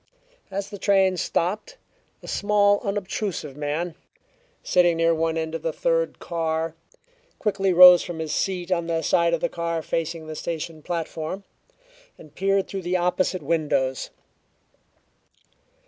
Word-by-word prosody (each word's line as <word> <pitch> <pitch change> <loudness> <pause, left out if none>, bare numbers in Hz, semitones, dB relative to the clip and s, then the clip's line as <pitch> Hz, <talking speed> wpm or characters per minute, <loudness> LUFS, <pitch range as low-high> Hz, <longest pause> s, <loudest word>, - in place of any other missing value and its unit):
As 200 +1 -4
the 205 - -7
train 195 -2 +3
stopped, 200 - -2 0.5
a - - -10
small, 205 0 +3
unobtrusive 195 - -3
man, 150 +4 -3 0.7
sitting 175 -2 +3
near 165 0 +3
one 165 0 0
end 160 0 -3
of 165 - -4
the 165 - -1
third - - 0
car, 165 -1 -2 0.6
quickly 195 -3 0
rose 180 0 +9
from 175 - -6
his 160 -2 -3
seat 185 -1 -2
on 170 -2 0
the 165 -1 -1
side 170 +2 +3
of 165 - -7
the - - +2
car 170 -1 -3
facing 165 0 -3
the 155 - -6
station 160 -1 -5
platform, 165 +3 -4 0.7
and 155 -3 -15
peered 195 0 +1
through 195 - -5
the 180 +1 0
opposite 180 0 0
windows. 145 -4 0
170 Hz, 140 wpm, -24 LUFS, 160-195 Hz, 0.7 s, rose